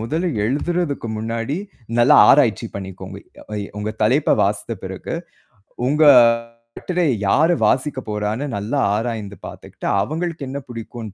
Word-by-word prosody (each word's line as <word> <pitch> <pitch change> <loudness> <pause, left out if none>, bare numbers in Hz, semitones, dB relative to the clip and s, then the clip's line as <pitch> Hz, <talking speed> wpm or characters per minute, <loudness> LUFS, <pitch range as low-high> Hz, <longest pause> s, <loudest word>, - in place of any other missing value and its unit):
முதல்ல 160 +11 -1 0.2
எழுதுறதுக்கு 145 +2 -1
முன்னாடி 115 +6 -3 0.4
நல்ல 120 - +5 0.2
ஆராய்ச்சி 125 -5 +4
பண்ணிக்கோங்க. 95 0 -8 0.3
வை 105 -1 -3 0.2
உங்க 105 +1 -3
தலைப்ப 130 +8 +3
வாசித்த - - -1
பிறகு - - -6 0.7
உங்க 150 +3 +3 0.7
கட்டுரைய 180 -5 0 0.2
யாரு 160 - +4
வாசிக்கப் 130 -1 0
போறான்னு 105 +6 -2
நல்ல 105 +6 -5 0.2
ஆராய்ந்து 110 -3 -4
பாத்துட்டு - - -10 0.2
அவுங்களுக்கு 160 - -3
என்ன 140 +2 -4
புடிக்குன்னு 115 -2 -8
120 Hz, 120 wpm, -20 LUFS, 105-150 Hz, 0.7 s, நல்ல